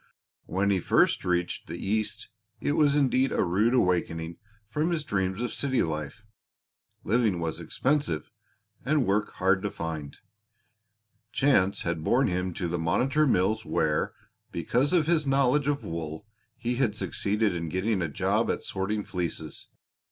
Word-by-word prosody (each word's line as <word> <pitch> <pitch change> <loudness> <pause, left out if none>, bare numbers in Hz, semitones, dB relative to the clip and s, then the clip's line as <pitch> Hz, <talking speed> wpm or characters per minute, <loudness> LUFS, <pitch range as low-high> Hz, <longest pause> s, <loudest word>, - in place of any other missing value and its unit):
When 100 +2 +1
he 95 - +2
first - - +3
reached 90 -1 -1
the - - -5
East 105 +1 -2 0.3
it - - 0
was 145 -2 +3
indeed 135 -2 +3
a - - +2
rude 105 +8 +2
awakening 85 -5 0 0.3
from 150 +9 0
his 165 -4 -1
dreams 95 -2 -1
of 125 - -3
city 130 -2 +1
life; 75 +5 -4 0.8
living 110 -3 +2
was 80 -1 -3
expensive, 135 - -1 0.5
and 145 0 +2
work 105 +2 0
hard 95 0 +2
to 105 - -1
find. 80 -5 -5 1.1
Chance 115 -9 +2
had 85 -2 -2
borne 125 +10 +3
him 90 +1 -1
to 90 - -2
the 85 0 -2
Monitor 135 - +2
Mills 110 0 +2
where, 75 -8 0 0.4
because 120 - 0
of 175 -4 +3
his 160 -3 +2
knowledge 135 +1 +3
of 145 -1 0
wool, 80 +2 -5 0.3
he 120 +1 -2
had 120 -6 +1
succeeded 105 -1 0
in 85 -2 -3
getting 95 +4 0
a 85 - -1
job 70 - +1
at - - -1
sorting 105 +2 -2
fleeces. 90 -5 -4
100 Hz, 150 wpm, -27 LUFS, 85-130 Hz, 1.1 s, first